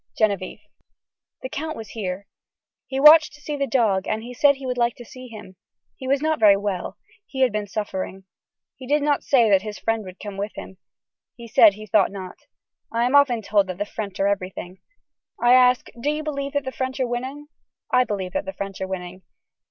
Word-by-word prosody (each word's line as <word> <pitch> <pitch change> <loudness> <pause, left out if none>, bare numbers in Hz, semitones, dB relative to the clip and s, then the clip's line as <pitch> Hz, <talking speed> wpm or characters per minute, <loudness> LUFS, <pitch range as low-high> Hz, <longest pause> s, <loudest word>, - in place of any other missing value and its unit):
(Genevieve.) 200 -4 0 0.8
The 260 - -4
count 315 +4 -4
was 220 -2 -8
here. 195 -3 -5 0.6
He 265 - -3
wanted 305 +2 +8
to 295 - -15
see 295 0 -5
the 280 -1 -1
dog 220 -7 +1
and 220 +1 -2
he 245 +1 -8
said 280 +3 +4
he 270 0 -10
would 250 -1 -2
like 235 0 +1
to 240 - -11
see 255 +2 -11
him. 210 -5 -12 0.4
He 260 - -8
was 275 +2 +1
not 315 0 +1
very 205 -3 +6
well. 195 -3 -4 0.3
He 265 - -5
had 255 -2 +4
been 210 -1 -3
suffering. 190 -2 -5 0.5
He 260 -1 -11
did 290 +1 +2
not 290 -1 +1
say 245 -5 +4
that 195 -1 +5
his 210 0 -7
friend 225 -1 -1
would 185 0 -11
come 205 -2 -7
with 205 +2 -4
him. 190 - -9 0.6
He 235 -1 -11
said 215 -2 +6
he 215 +1 -10
thought 205 -1 +3
not. 190 -2 -8 0.5
I 230 +1 0
am 250 - 0
often 255 -6 +4
told 200 -1 +2
that 185 -1 -5
the 205 - -2
french 205 -2 -6
are 195 - +2
everything. 185 -2 -4 0.6
I 240 +1 +5
ask 250 -1 +5
do 290 - 0
you 300 +1 -2
believe 280 -2 -4
that 285 -1 -1
the 260 - -3
french 260 +1 -4
are 260 - +2
winning. 260 +5 -5 0.4
I 250 0 +5
believe 195 -6 -4
that 290 - -2
the 290 - -5
french 195 -5 -6
are 190 - -2
winning. 185 0 -6
230 Hz, 215 wpm, -23 LUFS, 200-265 Hz, 0.8 s, wanted